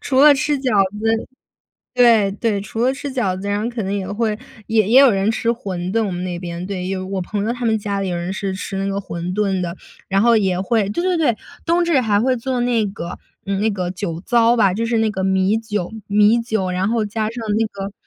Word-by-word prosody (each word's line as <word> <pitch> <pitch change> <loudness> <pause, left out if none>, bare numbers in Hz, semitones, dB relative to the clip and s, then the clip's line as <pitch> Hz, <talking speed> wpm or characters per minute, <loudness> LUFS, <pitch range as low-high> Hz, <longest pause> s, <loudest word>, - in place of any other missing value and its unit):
除 265 -1 +1
了 295 +1 +9
吃 290 +1 0
饺 250 -7 +3 0.2
子 225 +1 0 0.7
对， 230 -5 +5
对 205 0 -1
除 215 +3 -6
了 260 - +3
吃 280 +1 -6
饺 190 -8 -1
子， 200 - -6
然 205 +1 0
后 235 - -2
可 235 -2 -4
能 195 - -2
也 195 -2 -3
会 215 0 -1 0.3
也 220 -3 +2
也 245 +4 +6
有 275 -3 +7
人 195 +2 +1
吃 230 +1 -2
馄 185 -6 -4
饨， 225 -1 +1
我 200 - -2
们 175 0 -4
那 175 -1 -4
边。 175 0 -5
对， 190 -1 -3
我 190 +1 -4
朋 205 +2 -3
友 235 - 0
他 245 0 -5
们 220 -1 +2
家 200 -1 -3
里 195 - -2
有 175 - -2
人 175 +2 -3
是 195 -1 -3
吃 195 +1 -5
那 195 - -1
个 195 0 -2
馄 175 -2 -5
饨 195 -3 0
的， 170 -1 -3 0.3
然 195 0 +2
后 235 +1 +5
也 190 -3 +1
会 205 0 +1
对 345 - -2
对 365 -2 +2
对， 285 -9 +2 0.3
冬 345 +1 +2
至 330 -6 +3
还 210 -3 +2
会 255 +3 +2
做 250 +2 -2
那 240 -2 +1
个 180 -3 -6 0.3
嗯， 195 0 -1
那 220 +1 +2
个 185 -3 -3
酒 175 -3 -4
糟 235 -1 +4
吧， 200 -4 +4
就 230 - -1
是 230 0 +1
那 220 0 +2
个 190 -2 -3
米 190 +2 +2
酒 210 -4 -4 0.2
米 210 +3 +4
酒， 220 -5 -1
然 185 +2 0
后 225 -2 +1
加 215 +1 -2
上 230 0 -6
那 225 - +2
个 195 -1 -6
210 Hz, 265 characters per minute, -20 LUFS, 190-235 Hz, 0.7 s, 了